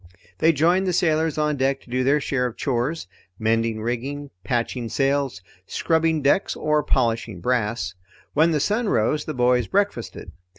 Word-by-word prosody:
They 165 Hz, -, +5 dB
joined 175 Hz, +5 st, +2 dB
the 180 Hz, -, +1 dB
sailors 160 Hz, -2 st, +1 dB
on 150 Hz, -1 st, +1 dB
deck 135 Hz, +1 st, 0 dB
to -, -, -20 dB
do 130 Hz, +1 st, +1 dB
their 140 Hz, +3 st, +3 dB
share 130 Hz, -3 st, 0 dB
of 120 Hz, -, -9 dB
chores 135 Hz, -, -1 dB, 0.3 s
mending 110 Hz, 0 st, 0 dB
rigging, 135 Hz, +5 st, -4 dB
patching 120 Hz, +2 st, -2 dB
sails, 135 Hz, -8 st, 0 dB, 0.2 s
scrubbing 160 Hz, -2 st, +1 dB
decks, 145 Hz, +8 st, +2 dB
or 150 Hz, 0 st, +1 dB
polishing 115 Hz, -8 st, 0 dB
brass. 105 Hz, -3 st, -1 dB, 0.4 s
When 160 Hz, +3 st, +4 dB
the 155 Hz, -2 st, +1 dB
sun 210 Hz, -, 0 dB
rose 145 Hz, -, +1 dB
the 155 Hz, -, -4 dB
boys 125 Hz, -2 st, +2 dB
breakfasted. 200 Hz, -, -2 dB
135 Hz, 160 wpm, -23 LUFS, 120-155 Hz, 0.4 s, They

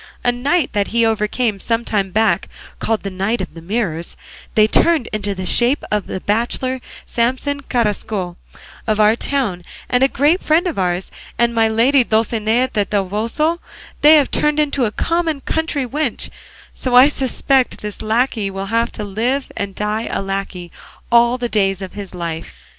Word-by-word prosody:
A 245 Hz, -, +3 dB
knight 275 Hz, +5 st, 0 dB
that 205 Hz, -2 st, +1 dB
he 230 Hz, 0 st, +2 dB
overcame 220 Hz, 0 st, 0 dB
some 230 Hz, +3 st, -1 dB
time 200 Hz, -3 st, 0 dB
back, 220 Hz, +4 st, +1 dB, 0.3 s
called 225 Hz, -1 st, -1 dB
the 195 Hz, -, -4 dB
Knight 195 Hz, +5 st, -1 dB
of -, -, -5 dB
the 165 Hz, -, -10 dB
Mirrors, 170 Hz, -3 st, -3 dB, 0.4 s
they 215 Hz, -, +6 dB
turned 315 Hz, +5 st, +3 dB
into 205 Hz, -1 st, -2 dB
the 185 Hz, 0 st, -5 dB
shape 245 Hz, +9 st, +2 dB
of 210 Hz, -2 st, 0 dB
the -, -, -4 dB
bachelor 240 Hz, +5 st, -1 dB, 0.2 s
Samson 260 Hz, +4 st, -1 dB
Carrasco 210 Hz, -7 st, -1 dB, 0.5 s
of 215 Hz, -1 st, +1 dB
our 215 Hz, +1 st, +5 dB
town 235 Hz, -10 st, -1 dB, 0.2 s
and 250 Hz, -, +1 dB
a -, -, +6 dB
great 295 Hz, +7 st, +2 dB
friend 320 Hz, +4 st, +2 dB
of 340 Hz, -, -2 dB
ours; 180 Hz, 0 st, -1 dB, 0.3 s
and 235 Hz, 0 st, +2 dB
my 225 Hz, -1 st, +3 dB
lady 245 Hz, +5 st, +4 dB
Dulcinea 225 Hz, +2 st, +1 dB
del 205 Hz, -1 st, 0 dB
Toboso 220 Hz, -, 0 dB, 0.4 s
they 305 Hz, +1 st, +8 dB
have 290 Hz, -3 st, +3 dB
turned 300 Hz, 0 st, +1 dB
into 285 Hz, -4 st, +1 dB
a 210 Hz, -, -1 dB
common 330 Hz, +2 st, 0 dB
country 320 Hz, -2 st, -1 dB
wench; 280 Hz, 0 st, -2 dB, 0.4 s
so 255 Hz, -2 st, -1 dB
I 255 Hz, +2 st, +9 dB
suspect 270 Hz, -2 st, 0 dB
this 210 Hz, -1 st, -6 dB
lacquey 220 Hz, -1 st, 0 dB
will 195 Hz, 0 st, -5 dB
have 230 Hz, +1 st, +1 dB
to 215 Hz, -, -5 dB
live 235 Hz, +7 st, -1 dB
and 195 Hz, -1 st, -4 dB
die 210 Hz, +2 st, -2 dB
a -, -, -2 dB
lacquey 195 Hz, -3 st, -4 dB, 0.4 s
all 235 Hz, +1 st, +5 dB
the 245 Hz, -1 st, -2 dB
days 195 Hz, -4 st, +1 dB
of 190 Hz, -2 st, -7 dB
his 200 Hz, -3 st, -8 dB
life." 165 Hz, -2 st, -5 dB
225 Hz, 175 wpm, -18 LUFS, 205-260 Hz, 0.5 s, I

